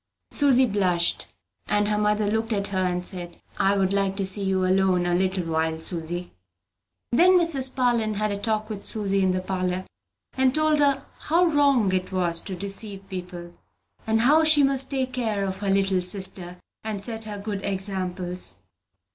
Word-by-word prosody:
Susy 265 Hz, -3 st, +4 dB
blushed; 185 Hz, -6 st, +1 dB, 0.4 s
and 205 Hz, 0 st, +1 dB
her 210 Hz, 0 st, 0 dB
mother 210 Hz, 0 st, +1 dB
looked 220 Hz, +2 st, -1 dB
at 200 Hz, -1 st, -1 dB
her, 190 Hz, -1 st, -1 dB
and 180 Hz, 0 st, -2 dB
said, 175 Hz, -3 st, -5 dB, 0.2 s
"I 195 Hz, +1 st, +2 dB
would 190 Hz, 0 st, +1 dB
like 195 Hz, -1 st, 0 dB
to 195 Hz, -, 0 dB
see 195 Hz, +2 st, -2 dB
you 190 Hz, -1 st, 0 dB
alone 185 Hz, -1 st, +2 dB
a 175 Hz, -, 0 dB
little 185 Hz, 0 st, 0 dB
while, 160 Hz, 0 st, -1 dB
Susy." 170 Hz, +1 st, -4 dB, 0.8 s
Then 350 Hz, +9 st, +5 dB
Mrs. 280 Hz, -7 st, 0 dB
Parlin 235 Hz, -4 st, +1 dB
had 215 Hz, +1 st, -1 dB
a 200 Hz, -, -2 dB
talk 215 Hz, 0 st, -1 dB
with 210 Hz, -3 st, -7 dB
Susy 195 Hz, -2 st, +2 dB
in 190 Hz, -, +2 dB
the 185 Hz, 0 st, 0 dB
parlor, 185 Hz, 0 st, -3 dB, 0.5 s
and 260 Hz, -1 st, +1 dB
told 310 Hz, -1 st, +2 dB
her 280 Hz, -2 st, +2 dB
how 340 Hz, +3 st, +2 dB
wrong 280 Hz, -, +2 dB
it 185 Hz, 0 st, -2 dB
was 175 Hz, -3 st, +1 dB
to 190 Hz, -, -6 dB
deceive, 195 Hz, +1 st, -2 dB, 1.0 s
and 220 Hz, 0 st, +2 dB
how 300 Hz, +6 st, +5 dB
she 310 Hz, -2 st, +5 dB
must 270 Hz, -1 st, +2 dB
take 260 Hz, -2 st, -2 dB
the 255 Hz, -, -2 dB
care 210 Hz, -4 st, -1 dB
of 190 Hz, 0 st, -4 dB
her 200 Hz, 0 st, -3 dB
little 195 Hz, -1 st, +2 dB
sister, 180 Hz, -1 st, +1 dB, 0.3 s
and 210 Hz, -2 st, -4 dB
set 225 Hz, 0 st, -3 dB
her 210 Hz, -1 st, -6 dB
good 200 Hz, -1 st, -5 dB
examples. 185 Hz, -2 st, -2 dB
200 Hz, 180 wpm, -24 LUFS, 185-225 Hz, 1.0 s, Then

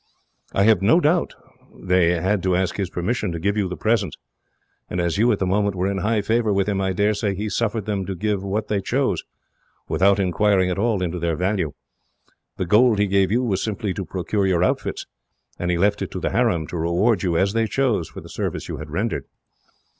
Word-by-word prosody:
"I 95 Hz, -, +2 dB
have 105 Hz, -3 st, +4 dB
no 115 Hz, -, +5 dB
doubt 170 Hz, +2 st, +1 dB, 0.4 s
they 90 Hz, -2 st, +2 dB
had 95 Hz, +3 st, 0 dB
to 95 Hz, -1 st, +1 dB
ask 95 Hz, 0 st, -1 dB
his 95 Hz, -3 st, -2 dB
permission 100 Hz, +3 st, -2 dB
to 85 Hz, -, -4 dB
give 100 Hz, +5 st, 0 dB
you 100 Hz, -3 st, 0 dB
the 90 Hz, -, -5 dB
presents, 110 Hz, -7 st, 0 dB, 0.7 s
and 90 Hz, -, -3 dB
as 85 Hz, +1 st, 0 dB
you, 120 Hz, +2 st, +4 dB
at 105 Hz, -, +1 dB
the 95 Hz, -, -1 dB
moment, 100 Hz, +1 st, +1 dB
were 90 Hz, 0 st, -1 dB
in 100 Hz, 0 st, -1 dB
high 105 Hz, +2 st, 0 dB
favour 110 Hz, 0 st, +1 dB
with 100 Hz, 0 st, +1 dB
him, 100 Hz, -2 st, 0 dB
I 95 Hz, 0 st, 0 dB
daresay 100 Hz, +1 st, 0 dB
he 105 Hz, +3 st, -3 dB
suffered 110 Hz, 0 st, -1 dB
them 100 Hz, -3 st, -2 dB
to 95 Hz, -, -3 dB
give 105 Hz, +1 st, -1 dB
what 100 Hz, +2 st, -2 dB
they 100 Hz, -2 st, 0 dB
chose, -, -, 0 dB, 0.7 s
without 100 Hz, +1 st, +3 dB
inquiring 95 Hz, 0 st, +2 dB
at 90 Hz, -, -2 dB
all 105 Hz, -3 st, +1 dB
into 90 Hz, 0 st, -3 dB
their 85 Hz, -1 st, 0 dB
value. 90 Hz, -3 st, -1 dB, 0.8 s
The 95 Hz, -, -1 dB
gold 110 Hz, +5 st, +4 dB
he 105 Hz, -, +3 dB
gave 100 Hz, -1 st, +2 dB
you 120 Hz, +3 st, +2 dB
was 100 Hz, -6 st, 0 dB
simply 105 Hz, -2 st, -2 dB
to 95 Hz, -, -4 dB
procure 95 Hz, +3 st, -1 dB
your 90 Hz, -2 st, +2 dB
outfits, -, -, -1 dB, 0.5 s
and 90 Hz, -, -2 dB
he 90 Hz, -, +1 dB
left 100 Hz, +3 st, +2 dB
it -, -, -3 dB
to -, -, -3 dB
the -, -, -2 dB
harem 80 Hz, -2 st, +1 dB
to 90 Hz, -, -4 dB
reward 90 Hz, +6 st, +1 dB
you, 85 Hz, -3 st, 0 dB
as 95 Hz, +3 st, +2 dB
they 115 Hz, 0 st, +1 dB
chose, 115 Hz, -, 0 dB
for -, -, -9 dB
the -, -, -12 dB
service -, -, -4 dB
you -, -, -5 dB
had 75 Hz, -, -8 dB
rendered. 100 Hz, +10 st, -2 dB
100 Hz, 220 wpm, -22 LUFS, 90-105 Hz, 0.8 s, no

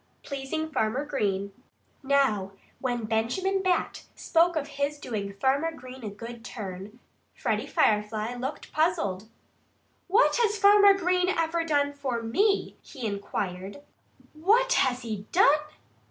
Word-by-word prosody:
XVIII -, -, -40 dB
PLEASING 295 Hz, +3 st, -4 dB
FARMER 250 Hz, +3 st, 0 dB
GREEN 200 Hz, -8 st, -2 dB, 0.5 s
Now, 265 Hz, -9 st, +1 dB, 0.3 s
when 245 Hz, -3 st, -2 dB
Benjamin 255 Hz, -, 0 dB
Bat 370 Hz, -2 st, -1 dB
spoke 340 Hz, +1 st, +2 dB
of 295 Hz, -2 st, -1 dB
his 285 Hz, +1 st, -2 dB
doing 210 Hz, -8 st, -4 dB
Farmer 275 Hz, +9 st, +1 dB
Green 255 Hz, -3 st, -11 dB
a 215 Hz, -, -3 dB
good 230 Hz, +3 st, -9 dB
turn, 205 Hz, 0 st, -8 dB, 0.4 s
Freddie -, -, -1 dB
Firefly 215 Hz, +2 st, +1 dB
looked 255 Hz, +4 st, -6 dB
puzzled. 260 Hz, -, 0 dB, 0.8 s
"What 430 Hz, +8 st, +4 dB
has 440 Hz, -3 st, +2 dB
Farmer 405 Hz, 0 st, +7 dB
Green 365 Hz, -1 st, +1 dB
ever 330 Hz, -1 st, 0 dB
done 285 Hz, -3 st, +1 dB
for 260 Hz, -5 st, -3 dB
me?" 395 Hz, -, +1 dB
he 260 Hz, -6 st, -8 dB
inquired. 200 Hz, +2 st, -4 dB, 0.5 s
"What 440 Hz, +11 st, +3 dB
has 255 Hz, -1 st, +1 dB
he 215 Hz, -3 st, -5 dB
done?" 305 Hz, -5 st, +5 dB
270 Hz, 130 wpm, -27 LUFS, 220-330 Hz, 0.8 s, Farmer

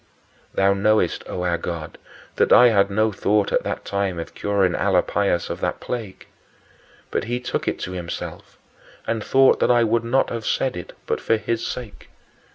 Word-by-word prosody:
Thou 100 Hz, 0 st, +4 dB
knowest, 100 Hz, -2 st, +1 dB
O 90 Hz, -, -4 dB
our 85 Hz, -1 st, 0 dB
God, 85 Hz, -2 st, -6 dB, 0.4 s
that -, -, +2 dB
I 125 Hz, -, +8 dB
had 100 Hz, -3 st, +3 dB
no 110 Hz, +2 st, +1 dB
thought 105 Hz, +1 st, +1 dB
at -, -, +2 dB
that -, -, -4 dB
time 100 Hz, -3 st, -1 dB
of 85 Hz, -, -6 dB
curing 100 Hz, -3 st, +1 dB
Alypius 95 Hz, -1 st, +1 dB
of -, -, -6 dB
that -, -, -1 dB
plague. 110 Hz, -6 st, -6 dB, 0.9 s
But -, -, -1 dB
he 120 Hz, +2 st, -2 dB
took 125 Hz, -, -3 dB
it -, -, 0 dB
to 90 Hz, -, -4 dB
himself 90 Hz, -2 st, -7 dB, 0.5 s
and 115 Hz, -2 st, -2 dB
thought 135 Hz, 0 st, +4 dB
that -, -, +2 dB
I 120 Hz, -1 st, +5 dB
would 115 Hz, +1 st, +1 dB
not 125 Hz, +3 st, +1 dB
have 115 Hz, -1 st, -4 dB
said 130 Hz, -, 0 dB
it 90 Hz, -, -8 dB
but -, -, -2 dB
for 115 Hz, -, +2 dB
his 115 Hz, +2 st, -2 dB
sake. 120 Hz, -5 st, -7 dB
100 Hz, 180 wpm, -22 LUFS, 95-115 Hz, 0.9 s, I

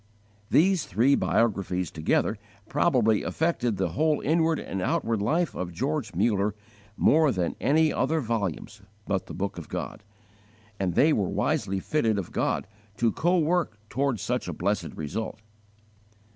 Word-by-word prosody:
These 185 Hz, -1 st, +3 dB
three 120 Hz, +9 st, +3 dB
biographies 95 Hz, -, +1 dB
together 80 Hz, +6 st, 0 dB, 0.3 s
probably 125 Hz, -7 st, +2 dB
affected 125 Hz, -, -1 dB
the -, -, 0 dB
whole 155 Hz, 0 st, +1 dB
inward 160 Hz, +1 st, +2 dB
and 95 Hz, -, -4 dB
outward 110 Hz, +3 st, 0 dB
life 160 Hz, +11 st, +1 dB
of 90 Hz, -1 st, -4 dB
George 130 Hz, -, -2 dB
Muller 105 Hz, +1 st, +1 dB, 0.4 s
more 155 Hz, -1 st, +4 dB
than 90 Hz, -5 st, -1 dB
any 155 Hz, +2 st, +3 dB
other 160 Hz, 0 st, +1 dB
volumes 105 Hz, -, -3 dB, 0.2 s
but 95 Hz, -2 st, -2 dB
the -, -, -7 dB
Book 95 Hz, -2 st, -3 dB
of 85 Hz, -, -10 dB
God, -, -, -5 dB, 0.8 s
and 90 Hz, -3 st, -1 dB
they 155 Hz, +2 st, +5 dB
were 100 Hz, -7 st, 0 dB
wisely 95 Hz, 0 st, 0 dB
fitted 110 Hz, -2 st, 0 dB
of 95 Hz, -, -4 dB
God -, -, 0 dB, 0.3 s
to 115 Hz, -1 st, +2 dB
co 175 Hz, +8 st, +1 dB
work 170 Hz, -7 st, +1 dB
toward 135 Hz, -2 st, 0 dB
such -, -, -2 dB
a -, -, -3 dB
blessed -, -, -2 dB
result. 80 Hz, +9 st, -4 dB
115 Hz, 145 wpm, -27 LUFS, 100-155 Hz, 0.8 s, they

